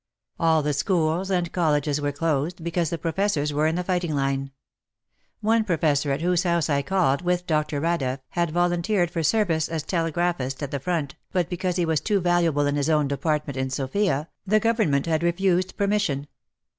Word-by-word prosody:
All 160 -2 +3
the 150 0 0
schools 170 +3 0
and 175 -3 0
colleges 150 -4 +1
w^ere 145 -1 -1
closed, 165 +2 -1
because 170 -1 -1
the 170 - -2
professors 165 -2 -1
were 150 +2 +2
in 160 - 0
the 180 - -1
fighting 175 -4 -1
line. 135 0 -1 0.9
One 225 +1 +3
professor 155 -7 +1
at 135 +3 -1
whose 175 0 +2
house 170 -4 +1
I 140 0 +2
called 170 -3 +1
with 180 0 0
Dr. 150 -3 0
Radeff, 140 -5 0
had 170 -1 0
volunteered 175 +2 +1
for 170 - -2
service 165 -3 +1
as 160 -2 -3
telegraphist 165 -5 -1
at 140 - -4
the 140 - -2
front, 155 -2 -2 0.2
but 180 -2 0
because 180 0 -1
he 175 -2 +1
was 160 -3 +1
too 205 +3 +1
valuable 170 -5 +2
in 145 0 0
his 145 +2 0
own 150 -2 +3
department 150 0 -1
in 130 0 -1
Sofia, 145 +4 -1 0.2
the 215 +2 +3
Government 215 - +1
had 160 -1 0
refused 180 +1 +1
permission. 200 -9 0
165 Hz, 180 wpm, -24 LUFS, 145-180 Hz, 0.9 s, All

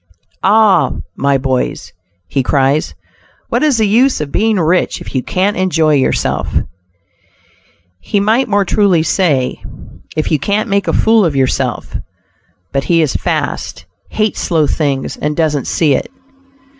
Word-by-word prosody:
"Ah! 210 0 +4 0.2
my 140 0 +1
boys," 130 -1 -2 0.3
he 135 - 0
cries, 135 +3 0 0.5
"what - - 0
is 300 -5 +2
the 220 - +2
use 250 +6 +3
of 150 -2 -4
being 220 0 +1
rich, 175 +1 +1
if - - -10
you 130 - 0
can't 190 +8 -1
enjoy 165 -4 +1
yourself?" 135 -2 0 1.5
He 200 - -1
might 220 +6 +2
more 205 -1 +1
truly 190 -4 +2
say, 150 -8 0 0.5
"if 155 - -1
you 155 - +2
can't 210 - -1
make 200 0 0
a - - +2
fool 225 -1 +3
of 160 -5 0
yourself;" 130 -1 -1 0.7
but 135 0 -1
he 165 -2 +3
is 150 - -1
"fast," - - -3 0.2
hates 215 -1 -1
slow 160 -4 +1
things, 140 -2 -2
and 150 0 -2
doesn't 150 -4 0
"see 155 -4 +2
it." - - -2
165 Hz, 145 wpm, -14 LUFS, 140-205 Hz, 1.5 s, Ah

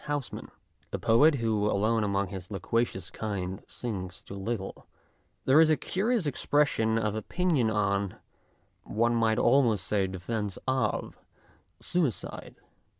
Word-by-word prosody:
Housman, 145 -3 -4 0.4
a - - -2
poet 145 +7 +5
who 110 -4 +1
alone 110 +2 +2
among 100 -1 0
his 95 -2 -7
loquacious 100 -1 -1
kind 95 -4 -4
sings 95 -6 -6
too - - -10
little, 100 0 -5 0.6
there 140 +4 +6
is 160 - +5
a 155 - +4
curious 215 +1 0
expression 140 -5 +1
of 105 -2 0
opinion 135 - 0
on 100 -2 0 0.7
one 115 +2 +1
might 115 -1 +2
almost 120 -6 +3
say 100 -3 +1
defence 95 +2 -4
of 130 -4 -1 0.6
suicide*. 160 - -2
110 Hz, 125 wpm, -29 LUFS, 100-130 Hz, 0.7 s, there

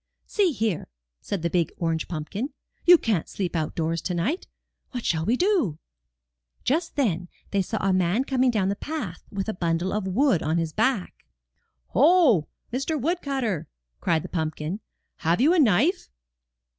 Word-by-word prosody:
*'See 395 -5 +2
here," 220 - -1 0.3
said 195 -5 -3
the 170 - +1
big 175 -3 +1
orange 165 -2 -1
pumpkin, 185 - -4 0.4
''you 355 0 +10
can't 215 - -1
sleep 180 -3 -3
outdoors 160 +1 -1
to 180 - -2
night. 240 - -1 0.4
What 245 -3 -5
shall 160 -1 +1
we 240 +3 +3
do?" 355 - +2 0.9
Just 320 +7 0
then 180 - 0 0.2
they 200 - +2
saw 220 +4 -3
a 195 0 +2
man 185 +6 +2
coming 260 -1 +2
along 190 -2 +2
the 200 - 0
path 225 - -5
with 195 0 -3
a 220 - -1
bundle 170 0 -1
of 210 -2 -1
wood 205 - +3
on 160 +2 0
his 165 -2 -1
back. 220 -3 -1 0.7
'*Ho, 275 - +5 0.3
Mr. 275 +4 -1
Woodcut 280 -2 -1
ter!" 180 -9 -1 0.3
cried 165 -4 +1
the - - -5
pumpkin, 160 +2 -3 0.4
have 165 +4 +1
you 295 +8 +5
a 365 - +3
knife?" 275 - +3
200 Hz, 165 wpm, -25 LUFS, 170-270 Hz, 0.9 s, you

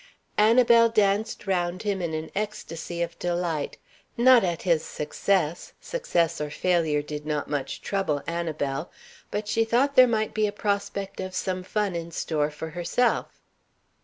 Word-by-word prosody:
Annabel 230 +1 +6
danced 215 0 +1
round 180 -1 -1
him 200 -3 -1
in 165 -2 -2
an 155 0 -5
ecstasy 175 -5 -4
of 170 0 -6
delight. 175 -4 -2 0.4
Not 245 -1 +7
at 175 -3 -1
his 170 -4 +2
success 170 +1 -1
success 175 - -1
or 150 - -2
failure 160 -3 +1
did 150 0 -6
not 150 -1 -2
much 145 -2 -3
trouble 190 -8 -1
Annabel 160 -3 -2 0.4
but 210 0 -3
she 225 +1 +2
thought 250 +5 +2
there 255 -2 +8
might 220 -2 0
be 215 -1 +2
a - - -2
prospect 200 -1 -2
of 185 0 -5
some 185 -1 -2
fun 205 +1 -1
in 170 0 -4
store 150 -3 -1
for 160 +1 -7
herself. 175 +9 0
180 Hz, 155 wpm, -26 LUFS, 160-210 Hz, 0.4 s, there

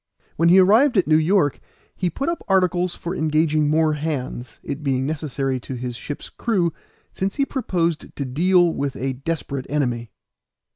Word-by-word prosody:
When 170 +1 +3
he 180 - +7
arrived 220 +7 +5
at 185 - +4
New 155 - +4
York 160 -2 +2 0.4
he 180 - -1
put 275 - -4
up 340 0 -2
articles 180 -2 +2
for 175 +2 -5
engaging 155 -1 +2
more 155 0 +3
hands, 145 -5 -4
it 145 - -5
being 135 -2 0
necessary 140 -3 -2
to 130 +2 -7
his 125 0 -5
ship's 145 +4 -6
crew, 185 -8 0 0.4
since 195 +1 -2
he 275 - +1
proposed 170 - -2
to 140 - -3
deal 175 +5 +3
with 140 -1 -2
a 135 +1 -2
desperate 140 -1 -4
enemy. 120 -5 -1
155 Hz, 165 wpm, -22 LUFS, 140-180 Hz, 0.4 s, he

